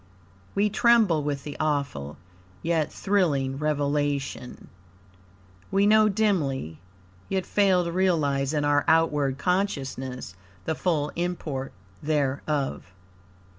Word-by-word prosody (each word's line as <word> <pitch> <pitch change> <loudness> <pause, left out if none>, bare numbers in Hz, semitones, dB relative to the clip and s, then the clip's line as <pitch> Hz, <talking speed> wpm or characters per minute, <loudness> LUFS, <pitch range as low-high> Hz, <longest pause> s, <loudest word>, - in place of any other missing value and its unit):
We 205 +1 +2
tremble 220 -8 +4
with 145 -1 -3
the 145 - -7
awful, 140 - -2 0.5
yet 160 -2 0
thrilling, 145 -10 0
revelation. 145 -3 -2 1.0
We 195 +1 +2
know 215 +1 +5
dimly, 150 - 0 0.5
yet 190 -1 -1
fail 190 -3 +3
to 170 - -3
realize 150 -7 +1
in 150 -2 0
our 145 0 +3
outward 150 -4 +2
consciousness 135 - -2 0.3
the - - 0
full 155 -3 -1
import 165 -6 -3 0.3
thereof. 145 - -1
150 Hz, 100 wpm, -26 LUFS, 140-180 Hz, 1.0 s, know